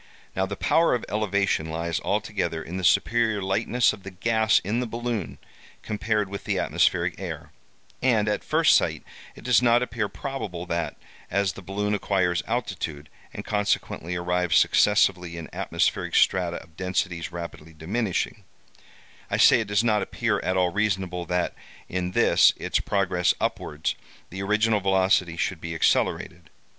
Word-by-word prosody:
Now, 95 0 0
the 100 - -4
power 165 +4 +3
of 120 - -4
elevation 100 -6 0
lies 85 0 -2
altogether 80 -1 -2
in 90 +3 -6
the 95 - -4
superior 115 +3 +2
lightness 105 +6 +1
of 100 - -11
the 100 - -8
gas 110 +3 +2
in 105 +5 -1
the 125 - -2
balloon 115 -5 -4 0.5
compared 105 -1 -1
with 100 +1 -7
the - - 0
atmospheric - - +1
air; - - -6 0.5
and, 115 -5 +2
at 105 - -1
first - - +4
sight, - - +1 0.3
it - - -13
does 125 -2 +4
not 120 0 +4
appear 115 -4 -3
probable 105 -11 -5
that, 85 -2 -2 0.3
as 100 0 0
the - - -10
balloon 105 +3 -2
acquires 95 -4 +1
altitude, 90 -10 -3 0.2
and - - -8
consequently 100 -4 -1
arrives 90 -1 +1
successively 90 -4 +3
in 85 - -7
atmospheric - - -1
strata 90 -2 +3
of 80 -1 -23
densities 90 -2 -2
rapidly 85 -2 -8
diminishing—I 90 +6 -5
say, - - +6
it 110 - -3
does 100 +2 +2
not 105 -3 +2
appear - - -1
at 95 0 -1
all 90 -1 +2
reasonable 95 -3 -1
that, 90 0 0 0.3
in 90 0 -3
this - - +5
its - - -1
progress 90 -4 +1
upwards, 75 +2 -2 0.4
the 95 +2 -5
original 105 +2 +2
velocity 95 -3 +2
should 85 -1 -2
be 85 0 -5
accelerated. 80 0 0
95 Hz, 150 wpm, -25 LUFS, 90-105 Hz, 0.5 s, say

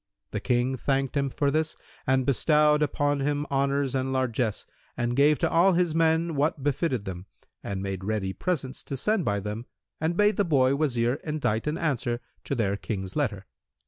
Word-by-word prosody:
The - - -2
King 125 +1 +1
thanked 135 +1 0
him 140 -1 +1
for 140 +2 0
this 155 +1 0 0.3
and 130 0 +3
bestowed 150 +2 +3
upon 145 -1 +1
him 145 +1 0
honours 140 0 +1
and 130 0 -1
largesse 125 -4 -1 0.3
and 120 0 0
gave 145 +2 +5
to - - +1
all 180 +3 +5
his 175 -2 +2
men 165 +1 +2
what 145 0 0
befitted 140 - 0
them 95 0 -6 0.4
and 95 -1 -4
made 95 -1 -4
ready 100 -2 -1
presents 140 - -2
to 135 - -3
send 210 - +1
by 100 -1 +1
them 105 +4 -5 0.3
and 165 +2 -1
bade 210 -1 +3
the 205 - +3
boy 135 -6 +3
Wazir 130 -3 +1
indite 150 -7 -1
an 150 +2 0
answer 130 -6 -1 0.3
to 140 - -1
their 100 -4 0
King's 95 -3 -5
letter. 110 -10 -1
135 Hz, 180 wpm, -27 LUFS, 120-150 Hz, 0.4 s, gave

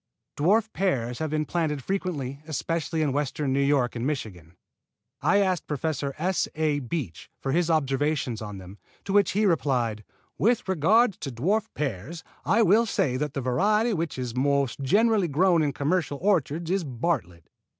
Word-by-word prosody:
Dwarf 210 +8 +2
pears 125 -11 -1
have 160 -1 -2
been 155 0 -1
planted 150 -4 -1
frequently, 150 -8 -3
especially 160 +1 -2
in 145 -3 0
Western 145 -1 -1
New 140 - +2
York 140 -3 +2
and 115 - -3
Michigan. 100 - -4 0.7
I 200 - +3
asked 185 -4 +1
Professor 145 -1 -2
S. 185 +3 0
A. 155 -2 +1
Beach 125 - -5
for 135 - -2
his 170 +3 +1
observations 140 -5 0
of 105 -2 -6
them, 95 +2 -11 0.3
to 195 - -3
which 205 -1 +4
he 210 +2 +2
replied: 125 - +1 0.4
"With 230 0 +2
regard 190 +6 +3
to 135 - -4
dwarf 195 - 0
pears 145 - -4 0.2
I 225 +6 +4
will 220 +5 +4
say 130 -10 0
that 150 0 -3
the 135 - -1
variety 210 - +2
which 165 -6 -3
is 125 -2 -4
most 140 0 +1
generally 205 - +3
grown 170 +3 +3
in 150 -2 +1
commercial 145 +2 -1
orchards 170 -3 0
is 195 -1 +1
Bartlett. 120 - -3
150 Hz, 165 wpm, -26 LUFS, 130-185 Hz, 0.7 s, which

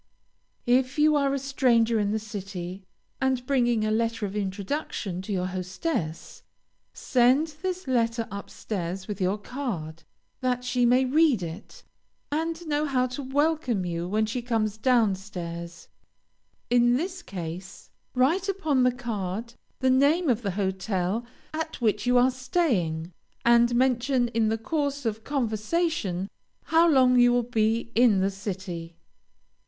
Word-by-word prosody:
If 255 +3 +2
you 300 0 +4
are 280 -1 +2
a 275 - 0
stranger 245 -4 +2
in 205 -1 +1
the 215 - 0
city, 195 -4 -6 0.4
and 260 -2 +1
bring 240 -5 +2
a 215 - 0
letter 225 0 0
of 200 0 -5
introduction 200 - -3
to 195 - -7
your 185 -2 0
hostess, 185 - -4 0.5
send 260 +5 +2
this 370 -3 -3
letter 230 -2 +1
up 200 0 -7
stairs 190 -2 -5
with 205 -2 -5
your 185 +3 +1
card, 200 - -5 0.4
that 250 -1 -1
she 250 -1 +2
may 250 +2 +4
read 280 - +3
it, 170 +5 -8 0.5
and 325 +3 -2
know 300 0 0
how 255 -2 +2
to 285 - -4
welcome 270 - 0
you 170 0 -3
when 215 +3 +1
she 230 +3 -3
comes 225 -3 -1
down 230 -2 +3
stairs. 170 -3 -7 0.8
In 240 0 +4
this 360 +4 -4
case, 180 - -8 0.2
write 330 +10 +2
upon 315 -9 +1
the 250 0 +4
card 230 -2 -4 0.3
the 260 0 +4
name 290 +5 +3
of 240 -2 +2
the 205 - -2
hotel 190 +2 -1 0.3
at 320 0 -4
which 215 -2 0
you 250 0 +4
are 250 +1 +5
staying, 230 - -1 0.3
and 235 0 +5
mention 250 0 +2
in 225 -2 +1
the 225 - 0
course 285 +2 -2
of 220 -1 -2
conversation, 230 - -1 0.4
how 330 +1 +4
long 255 -4 +5
you 245 0 +6
will 245 0 +2
be 230 0 0
in 230 -4 +5
the 195 +1 +1
city. 185 -4 -6
235 Hz, 150 wpm, -26 LUFS, 195-265 Hz, 0.8 s, you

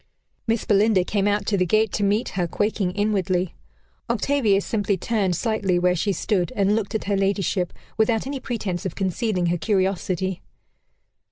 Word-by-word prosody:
Miss 225 0 0
Belinda 205 -2 +3
came 200 +2 0
out 205 0 +1
to 205 - +1
the 185 - +3
gate 215 +3 +2
to 205 - 0
meet 205 +4 +1
her, 180 -2 -1
quaking 205 +1 0
inwardly. 190 -3 0 0.6
Octavia 240 -9 +2
simply 200 -1 -1
turned 195 -2 0
slightly 200 -3 0
where 180 0 +2
she 200 +4 0
stood, 185 -3 0
and 200 +1 +2
looked 220 -1 -2
at 220 - -1
her 200 - 0
ladyship, 195 -2 0 0.3
without 220 +1 +2
any 275 0 -4
pretence 210 -8 -3
of 190 - -4
concealing 190 0 -1
her 175 0 0
curiosity. 190 0 0
200 Hz, 165 wpm, -23 LUFS, 185-215 Hz, 0.6 s, Belinda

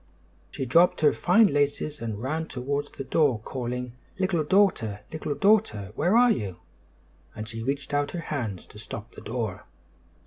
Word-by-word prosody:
She 135 - -4
dropped 165 +9 +4
her 150 - +5
fine 200 +6 +5
laces 145 - 0
and 110 -1 -4
ran 160 +5 -2
towards 140 +3 -3
the - - -7
door, 140 -3 +2
calling, 125 +1 -4 0.2
"Little 185 -4 +1
Daughter! 145 - +2
Little 155 -2 -3
Daughter! 150 - +2
Where 175 - +2
are 245 0 +6
you?" 100 - -2 0.8
and 110 -1 -6
she 115 0 -6
reached 140 +4 -3
out 145 0 +1
her 175 - -5
hands 120 - -4
to 105 - -14
stop 115 +1 -8
the - - -11
door. 110 -4 -4
140 Hz, 165 wpm, -26 LUFS, 115-160 Hz, 0.8 s, are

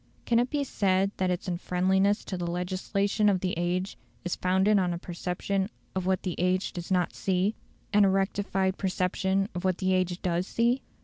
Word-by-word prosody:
Can 235 -1 +3
it 245 +1 +1
be 290 0 0
said 195 -6 +1
that 185 -1 +1
its 180 +2 -2
unfriendliness 190 +3 +1
to 190 - -4
the 175 -1 -3
legislation 195 +4 0
of 190 -3 +1
the 185 - 0
age 180 +3 -2 0.3
is 180 - -1
founded 190 +3 +3
on 180 -2 +1
a - - -4
perception 180 +3 -2 0.2
of 185 -1 -2
what 190 -1 +1
the 180 - -2
age 185 +2 +1
does 175 -2 -6
not 180 -2 +1
see, 190 +2 0 0.4
and 205 0 +6
a 195 - +5
rectified 195 0 0
perception 190 +1 0
of 180 - -4
what 185 -1 +1
the 190 0 +1
age 185 -1 0
does 175 +1 0
see? 240 +3 +1
185 Hz, 190 wpm, -28 LUFS, 180-195 Hz, 0.4 s, and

